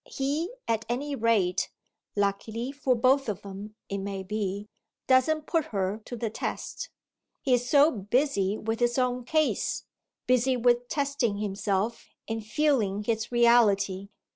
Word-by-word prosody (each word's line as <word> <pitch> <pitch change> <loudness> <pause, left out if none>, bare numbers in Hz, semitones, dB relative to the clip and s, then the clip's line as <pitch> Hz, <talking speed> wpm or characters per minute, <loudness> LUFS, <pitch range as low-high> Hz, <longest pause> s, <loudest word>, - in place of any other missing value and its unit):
He 295 +7 -1 0.2
at 225 -1 0
any 280 +4 -2
rate, 220 -7 +1 0.5
luckily 215 +5 -1
for 275 -3 +1
both 260 +2 +3
of 200 - -4
them 200 +2 -8
it 200 - -3
may 195 0 -4
be, 200 0 -3 0.4
doesn't 295 +4 +3
put 325 -2 +1
her 200 -4 -2
to 245 - -6
the 225 -2 -3
test: - - -4 0.5
he 260 - +2
is 245 0 +1
so 290 +2 +6
busy 210 -1 0
with 225 +1 -3
his 240 0 +1
own 250 -1 0
case, 310 +3 0 0.4
busy 255 +1 +3
with 245 0 +2
testing 280 -7 0
himself 205 +1 -2 0.2
and 225 -1 -3
feeling 215 -5 +1
his 225 +1 -1
reality. 205 -5 +3
230 Hz, 140 wpm, -28 LUFS, 205-260 Hz, 0.5 s, so